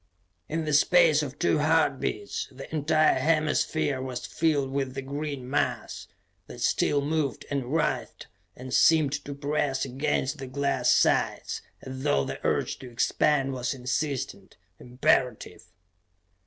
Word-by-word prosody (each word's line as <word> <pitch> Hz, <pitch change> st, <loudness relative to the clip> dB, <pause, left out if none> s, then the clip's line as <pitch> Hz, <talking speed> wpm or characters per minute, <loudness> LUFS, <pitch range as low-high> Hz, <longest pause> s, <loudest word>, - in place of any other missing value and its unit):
_ -, -, -42 dB, 0.5 s
In 160 Hz, +1 st, -2 dB
the 150 Hz, -, -1 dB
space 155 Hz, 0 st, +5 dB
of 140 Hz, -1 st, -6 dB
two 155 Hz, -, +2 dB
heart 155 Hz, -3 st, +2 dB
beats, 205 Hz, -, -3 dB
the 135 Hz, +1 st, -10 dB
entire 155 Hz, +1 st, +3 dB
hemisphere 155 Hz, -3 st, +1 dB
was 130 Hz, -2 st, -5 dB
filled 145 Hz, -5 st, 0 dB
with 135 Hz, -1 st, -2 dB
the 135 Hz, -, -4 dB
green 140 Hz, -1 st, -5 dB
mass, 140 Hz, -, -2 dB, 0.4 s
that -, -, -10 dB
still 145 Hz, -, +2 dB
moved 145 Hz, -4 st, -2 dB
and 135 Hz, -3 st, -2 dB
writhed 160 Hz, +1 st, -1 dB, 0.3 s
and 130 Hz, +1 st, -8 dB
seemed 155 Hz, -4 st, +4 dB
to 140 Hz, -, -7 dB
press 140 Hz, -1 st, -1 dB
against 135 Hz, +2 st, -1 dB
the 135 Hz, -, -6 dB
glass 140 Hz, +2 st, 0 dB
sides -, -, +1 dB, 0.2 s
as 130 Hz, 0 st, -7 dB
though 70 Hz, -, +2 dB
the -, -, -5 dB
urge -, -, 0 dB
to 130 Hz, -, -9 dB
expand 135 Hz, +3 st, +1 dB
was 125 Hz, +1 st, -2 dB
insistent, 130 Hz, -6 st, -3 dB, 0.2 s
imperative.... 125 Hz, -5 st, 0 dB
140 Hz, 140 wpm, -27 LUFS, 130-150 Hz, 0.5 s, space